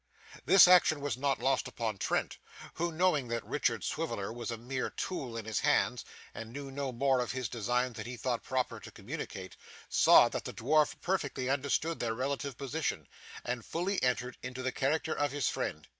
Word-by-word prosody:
This 185 +2 +9
action 180 -4 +6
was 140 -4 -2
not 135 +2 0
lost 130 +1 +1
upon 110 -4 -3
Trent, - - -1 0.3
who, 170 +1 -1
knowing 160 -5 +2
that 115 -1 -3
Richard - - 0
Swiveller 100 +2 -3
was 120 -1 -5
a 115 - -3
mere 125 +3 -3
tool 130 -11 -4
in 110 - -5
his 110 -3 -1
hands - - +2 0.3
and 115 0 -7
knew 140 +1 -7
no 140 -1 -3
more 130 +1 +2
of 125 - -2
his 130 -2 -2
designs 120 +2 -1
than - - -5
he 125 0 -6
thought 120 0 -1
proper 130 -1 -2
to - - -10
communicate, 95 -1 -7 0.3
saw - - +7
that - - -4
the - - -5
dwarf 150 +5 +2
perfectly 145 -8 -1
understood 140 +4 0
their 115 -1 -1
relative 135 +1 -3
position, 140 - -3 0.4
and 125 -1 -3
fully 185 - -2
entered 125 -1 0
into 125 0 -6
the 130 - 0
character 155 +5 0
of 145 -1 0
his 145 -3 0
friend. 75 0 -4
130 Hz, 190 wpm, -31 LUFS, 120-145 Hz, 0.4 s, This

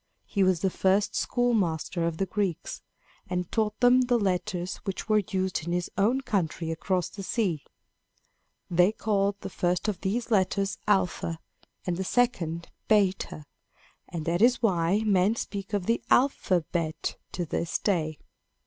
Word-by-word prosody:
He 200 - -1
was 185 -3 +3
the 190 - +1
first 195 +3 +2
schoolmaster 185 -8 0
of 165 -1 -3
the 195 - 0
Greeks, 190 -3 -2 0.5
and 180 -1 -2
taught 215 -2 0
them 250 +1 +6
the 245 -1 +2
letters 180 -3 -1
which 195 +1 -5
were 215 -1 +4
used 190 -3 -1
in 170 - -1
his 175 0 -2
own 230 +7 +2
country 170 - -1
across 180 +2 -1
the 200 - -9
sea. 190 -6 -1 1.0
They 180 +4 +3
called 200 -2 +1
the - - -5
first 180 +3 0
of 205 -4 -2
these 230 +5 -2
letters 195 -1 +1
alpha 180 -4 +1 0.5
and 175 -2 -1
the 190 - -1
second 180 -8 0 0.2
beta, 195 -7 +1 0.7
and 165 -3 -5
that 175 +2 0
is 245 +2 +5
why 190 -2 +2
men 200 +1 +3
speak 200 -4 -5
of 200 -3 -1
the 230 +3 +1
alphabet 175 - +1 0.2
to 175 - -2
this 170 +1 -1
day. 160 -6 0
190 Hz, 150 wpm, -27 LUFS, 175-210 Hz, 1.0 s, them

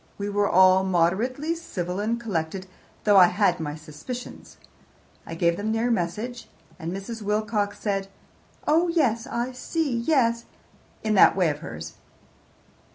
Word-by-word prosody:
We 200 0 -3
were 205 0 +1
all 185 +1 +6
moderately 200 - +1
civil 185 - -4
and 225 +3 -1
collected, 185 -4 -3 0.4
though 205 -2 +5
I 180 -2 +9
had 180 -1 +1
my 150 -2 -4
suspicions. 160 - -9 0.7
I 165 - -6
gave 170 0 +1
them 220 +2 -1
your 235 +2 +1
message, 225 +6 -3 0.3
and 165 +1 -4
Mrs. 195 +5 -6
Wilcox 210 0 -1
said, 195 -2 -2 0.6
'Oh 325 +4 +4
yes, 255 -10 +1
I 240 +2 -2
see; 285 +1 -2
yes,' 235 -3 +1 0.6
in 215 -1 +1
that 200 - +6
way 180 -5 +2
of 145 - -7
hers." 80 - -8
205 Hz, 145 wpm, -25 LUFS, 180-235 Hz, 0.7 s, I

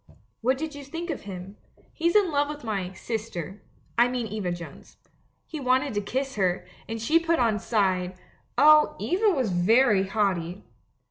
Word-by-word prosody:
'What 260 +3 +2
did 315 +2 -4
you 285 0 -8
think 330 +5 -5
of - - -5
him? 190 +2 -8 0.4
He's 340 +2 0
in 400 -5 +4
love 290 0 +1
with 295 -2 -7
my 195 -5 -2
"sister" 195 -3 -5 0.2
— - - -35
I 240 - +6
mean 245 -1 -2
Eva 210 -4 -3
Jones. 175 -1 -9 0.5
He 310 - -6
wanted 260 0 +1
to 205 - 0
kiss 265 +4 -3
her, 185 -2 +1 0.2
and 225 0 -3
she 305 +9 +3
put 335 0 +1
on 225 -3 +2
side 185 -4 0 0.2
— - - -40
oh, 305 0 +6
Eva 405 +5 +2
was 260 - 0
very 200 +2 +4
haughty! 190 -3 -1
230 Hz, 180 wpm, -26 LUFS, 195-290 Hz, 0.5 s, I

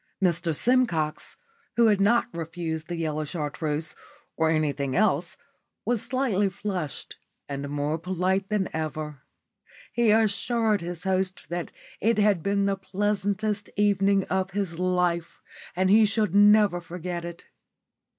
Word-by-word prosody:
Mr 175 -3 +1
Simcox, 195 - +1 0.4
who 235 - +5
had 210 -3 +4
not 235 +4 +4
refused 165 -1 -4
the 175 - -3
yellow 155 -2 -2
Chartreuse 150 0 -3 0.4
or 160 -1 +2
anything 145 -4 0
else, 215 +3 +1 0.5
was 240 -3 +1
slightly 230 -5 +1
flushed 185 -6 -5 0.3
and 140 0 -4
more 145 +2 -1
polite 185 +3 -1
than 210 -3 0
ever. 155 -2 -4 0.7
He 235 -2 +3
assured 220 0 +2
his 175 0 -5
host 190 0 -1
that 175 0 -3 0.3
it 230 +1 +2
had 205 -4 +3
been 200 +2 +1
the 200 0 0
pleasantest 205 +1 -1
evening 200 -1 +3
of 190 0 -1
his 190 -4 -3
life 180 -2 0 0.4
and 185 +1 +2
he 220 +1 +7
should 210 -3 0
never 205 -3 +5
forget 175 0 -5
it. 170 0 -8
185 Hz, 130 wpm, -26 LUFS, 165-205 Hz, 0.7 s, he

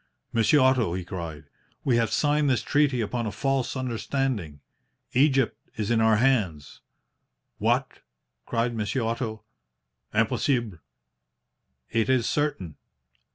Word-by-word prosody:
"'Monsieur 115 +6 +4
Otto,' 130 -9 +3
he 90 -1 -4
cried, 85 -4 -6 0.4
'we 125 -3 +2
have 115 -2 +1
signed 150 -1 +2
this 130 - +1
treaty 145 -4 +2
upon 115 +1 -2
a - - -3
false 135 +5 -1
understanding. 120 - -2 0.5
Egypt 135 -1 +3 0.2
is 105 0 -1
in 115 -1 +3
our 110 -1 +5
hands.' 105 - 0 0.8
"'What!' - - 0 0.5
cried 120 0 0
Monsieur 110 +3 -1
Otto. 115 -1 -3 0.7
'Impossible!' 120 - 0 1.1
"'It 115 +2 +1
is 130 -3 +2
certain. 145 - -2
115 Hz, 115 wpm, -26 LUFS, 105-130 Hz, 1.1 s, our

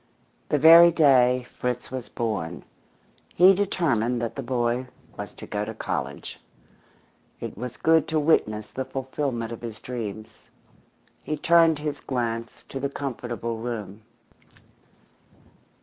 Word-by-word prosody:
The 150 - +2
very 165 +3 +9
day 130 -6 +4
Fritz 125 0 -4
was 130 -2 -6
born 90 -9 -3 0.7
he 185 +3 +7
determined 145 - 0
that 115 -1 -3
the 135 - -4
boy 120 0 -1 0.3
was - - -7
to - - -10
go 105 0 -3
to 110 +1 -6
college. - - -5 1.0
It - - -6
was 125 +3 -6
good 160 0 +3
to 160 -1 0
witness 110 -9 +1
the 130 - -3
fulfilment 130 -3 -3
of 115 - -7
his 115 -2 -7
dreams. 110 -4 -7 0.7
He 155 - -3
turned 165 0 +4
his 150 0 -4
glance 115 -3 -3
to 135 - -5
the 140 +1 -2
comfortable 120 -4 -4
room. 110 -3 -6
125 Hz, 130 wpm, -25 LUFS, 115-145 Hz, 1.0 s, very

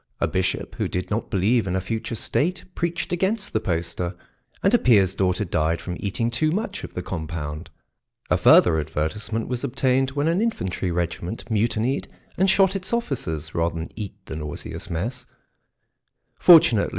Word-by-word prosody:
A - - +2
bishop 95 -1 -1
who - - 0
did 90 0 -4
not 115 +2 -1
believe 105 +3 +2
in 90 - -1
a - - +2
future 110 +4 -3
state 175 - -1
preached 170 +1 -2
against 195 +4 0
the 110 - +2
poster, 85 -1 -2 0.5
and 195 - +3
a 240 - +6
peer's 100 -7 +4
daughter 95 +2 0
died 80 -1 0
from 90 - -5
eating 115 +4 -1
too 155 +6 +1
much 205 +3 -3
of - - -8
the 90 - -3
compound. 80 -2 -5 0.6
A - - +6
further 80 -2 +6
advertisement 80 +9 -2
was 125 0 -3
obtained 130 0 +1
when 145 +2 0
an 170 +4 +2
infantry 95 - -1
regiment 85 +6 -3
mutinied 115 +4 0 0.3
and 190 +2 +3
shot 195 0 +4
its 190 -1 -2
officers 80 - -2
rather 85 0 0
than 80 0 -5
eat 105 -4 -6
the - - -6
nauseous 75 -1 -6
mess; 115 +10 -3 1.1
fortunately. 155 - +7
105 Hz, 165 wpm, -24 LUFS, 85-140 Hz, 1.1 s, fortunately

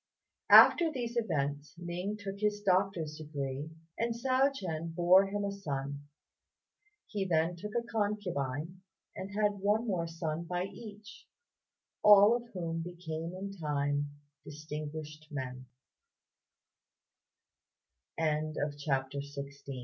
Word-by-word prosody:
After 335 -2 +9
these 240 -4 -4
events 145 -9 -1
Ning 180 +4 -4
took 200 -1 -6
his 210 0 0
doctor's 185 -5 +1
degree 145 -1 -4 0.3
and 230 0 0
Hsiao 260 +3 +3
ch'ien 165 - -4
bore 185 +3 +6
him 205 +1 -2
a 200 - -1
son. 145 -7 -4 1.0
He 205 -3 -2
then 170 -1 +1
took 210 +5 -7
a 235 - +1
concubine, 185 - -2 0.3
and 190 - -6
had 205 -1 +2
one 210 +4 +2
more 180 -6 -1
son 165 0 -3
by 180 +1 -1
each, 210 +2 -10 0.7
all 210 +2 +8
of 240 0 -5
whom 165 -3 -3
became 170 -1 -5
in 195 +1 -5
time 145 -3 -1 0.3
distinguished 155 0 -7
men. 130 -3 -5
180 Hz, 105 wpm, -32 LUFS, 155-205 Hz, 1.0 s, After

